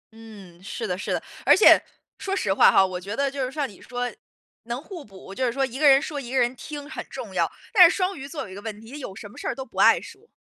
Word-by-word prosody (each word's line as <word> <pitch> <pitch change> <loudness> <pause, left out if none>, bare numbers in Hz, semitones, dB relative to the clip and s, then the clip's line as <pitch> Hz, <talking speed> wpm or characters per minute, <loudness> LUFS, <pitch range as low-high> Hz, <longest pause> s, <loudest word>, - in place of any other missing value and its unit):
嗯， 200 -6 -14
是 210 +3 -5
的 180 -4 -2
是 195 - -5
的， - - 0 0.2
而 - - +6
且， - - +7 0.4
说 390 0 -2
实 195 - 0
话 - - +6
哈， 190 - +5
我 185 -1 -4
觉 200 +4 -5
得 275 -1 0
就 275 -1 -3
是 255 - -3
像 285 -1 -2
你 200 - -16
说 245 0 -4 0.5
能 240 +1 -4
互 335 -2 -9
补， 195 -1 -13
就 260 - -3
是 245 - +1
说 270 +2 0
一 260 +1 -7
个 300 - +5
人 270 0 +7
说， 290 0 -5
一 245 -1 -9
个 265 - -1
人 245 +1 +2
听 290 +2 -8
很 310 - -6
重 - - -8
要， - - 0 0.2
但 360 -5 +9
是 - - -2
双 370 0 0
鱼 275 -2 -8
座 300 +1 -5
有 - - -10
一 - - -10
个 200 - -8
问 215 -2 -7
题， 225 +2 -14
她 285 - -8
有 225 -9 -8
什 205 - -9
么 - - -16
事 - - -5
儿 - - -2
都 265 -1 -6
不 - - -9
爱 - - +6
说。 400 +5 -14
255 Hz, 325 characters per minute, -24 LUFS, 205-290 Hz, 0.5 s, 但